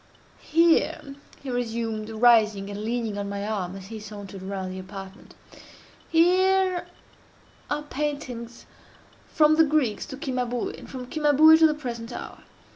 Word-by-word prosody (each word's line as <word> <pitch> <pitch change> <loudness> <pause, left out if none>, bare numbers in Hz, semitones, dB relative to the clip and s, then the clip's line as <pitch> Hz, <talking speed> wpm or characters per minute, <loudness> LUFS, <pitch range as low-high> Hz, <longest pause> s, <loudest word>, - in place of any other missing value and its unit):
"Here," 320 -3 +2 0.3
he 265 - -4
resumed, 225 -3 -3
arising 215 -3 +3
and 205 +1 -6
leaning 225 -2 -2
on 200 0 -4
my 200 0 -4
arm 195 -4 -3
as 195 -1 -9
he 220 +2 -8
sauntered 205 -2 -9
around 190 -1 -5
the 185 - -6
apartment, 195 +1 -10 0.7
"here 370 +2 +3 0.8
are 295 - -2
paintings 280 -5 -5 0.6
from 310 0 +4
the 320 - +7
Greeks 290 -8 0
to 265 -3 -8
Cimabue, 250 -4 -2
and - - -12
from 255 -2 -7
Cimabue 305 +2 +6
to 320 - +7
the 305 - -1
present 240 -5 -6
hour. - - -8
240 Hz, 140 wpm, -25 LUFS, 205-300 Hz, 0.8 s, the